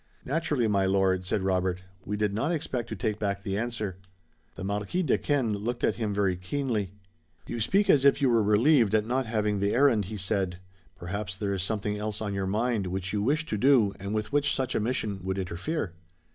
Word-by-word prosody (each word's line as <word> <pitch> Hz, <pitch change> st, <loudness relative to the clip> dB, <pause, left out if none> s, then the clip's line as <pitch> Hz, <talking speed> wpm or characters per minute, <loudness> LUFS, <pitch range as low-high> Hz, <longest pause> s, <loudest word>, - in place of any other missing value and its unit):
"Naturally, 145 Hz, -4 st, 0 dB
my 100 Hz, -2 st, +2 dB
lord," 95 Hz, -1 st, +2 dB
said 95 Hz, -, 0 dB
Robert. 95 Hz, -1 st, 0 dB, 0.2 s
"We 105 Hz, +1 st, -2 dB
did 105 Hz, -1 st, 0 dB
not 130 Hz, +10 st, 0 dB
expect 130 Hz, -8 st, -3 dB
to 110 Hz, -, -4 dB
take 105 Hz, +2 st, -2 dB
back 100 Hz, -1 st, -2 dB
the 100 Hz, -1 st, -2 dB
answer." 110 Hz, -4 st, -3 dB, 0.6 s
The 95 Hz, -, -7 dB
Marquis 105 Hz, -, -1 dB
Duquesne 140 Hz, -8 st, +1 dB
looked 120 Hz, +4 st, -4 dB
at -, -, +2 dB
him 110 Hz, -3 st, -1 dB
very 100 Hz, -2 st, +1 dB
keenly. 105 Hz, -1 st, -2 dB, 0.5 s
"You 120 Hz, -, -4 dB
speak 195 Hz, -, +2 dB
as 135 Hz, -, +5 dB
if 140 Hz, 0 st, +5 dB
you 140 Hz, -, +3 dB
were 115 Hz, -1 st, +4 dB
relieved 110 Hz, +2 st, +4 dB
at 105 Hz, -1 st, +2 dB
not 125 Hz, +2 st, -1 dB
having 105 Hz, -2 st, 0 dB
the 100 Hz, +2 st, +1 dB
errand," 125 Hz, -6 st, +4 dB
he 105 Hz, +3 st, -6 dB
said. 95 Hz, -2 st, -1 dB, 0.4 s
"Perhaps 95 Hz, +1 st, -5 dB
there 100 Hz, 0 st, -2 dB
is 95 Hz, -, -2 dB
something 105 Hz, +1 st, -2 dB
else 105 Hz, 0 st, -3 dB
on 105 Hz, -2 st, -3 dB
your 95 Hz, -1 st, -2 dB
mind 110 Hz, 0 st, 0 dB
which 95 Hz, +1 st, -3 dB
you 105 Hz, -, 0 dB
wish 150 Hz, +8 st, +1 dB
to 105 Hz, -8 st, -3 dB
do 120 Hz, -5 st, +4 dB
and 100 Hz, +1 st, -5 dB
with 110 Hz, +1 st, -2 dB
which 145 Hz, -1 st, +2 dB
such 130 Hz, -2 st, -1 dB
a -, -, +1 dB
mission 105 Hz, -3 st, -1 dB
would 95 Hz, +1 st, -3 dB
interfere." 95 Hz, -, -3 dB
105 Hz, 210 wpm, -28 LUFS, 95-120 Hz, 0.6 s, as